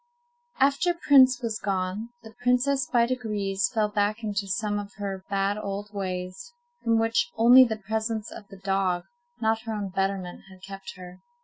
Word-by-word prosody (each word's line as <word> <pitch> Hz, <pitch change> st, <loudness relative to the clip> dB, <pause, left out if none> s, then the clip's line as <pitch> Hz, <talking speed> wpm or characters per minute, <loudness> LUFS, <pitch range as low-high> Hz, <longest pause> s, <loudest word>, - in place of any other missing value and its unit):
XI. 270 Hz, -, +7 dB
After 305 Hz, +6 st, +1 dB
Prince 260 Hz, -6 st, +5 dB
was 225 Hz, -2 st, -2 dB
gone, 195 Hz, +3 st, -2 dB
the 220 Hz, -1 st, -12 dB
princess, 250 Hz, +2 st, +2 dB
by 235 Hz, -1 st, +4 dB
degrees, 210 Hz, -6 st, -1 dB
fell 220 Hz, -3 st, +1 dB
back 210 Hz, +2 st, -1 dB
into 205 Hz, -2 st, -2 dB
some 205 Hz, +1 st, -1 dB
of 200 Hz, -1 st, -8 dB
her 195 Hz, -2 st, -5 dB
bad 200 Hz, +1 st, 0 dB
old 205 Hz, 0 st, -5 dB
ways, 185 Hz, -, -5 dB, 0.3 s
from 230 Hz, -1 st, +3 dB
which 225 Hz, +6 st, +1 dB
only 245 Hz, +3 st, +8 dB
the 220 Hz, -2 st, -3 dB
presence 220 Hz, +1 st, -3 dB
of 205 Hz, -, -10 dB
the 195 Hz, -, -13 dB
dog, 190 Hz, -2 st, 0 dB, 0.4 s
not 220 Hz, 0 st, +1 dB
her 225 Hz, -, -3 dB
own 205 Hz, -2 st, -3 dB
betterment, 195 Hz, -1 st, -2 dB
had 190 Hz, -1 st, -16 dB
kept 195 Hz, 0 st, -9 dB
her. 180 Hz, 0 st, -11 dB
210 Hz, 175 wpm, -26 LUFS, 195-230 Hz, 0.4 s, only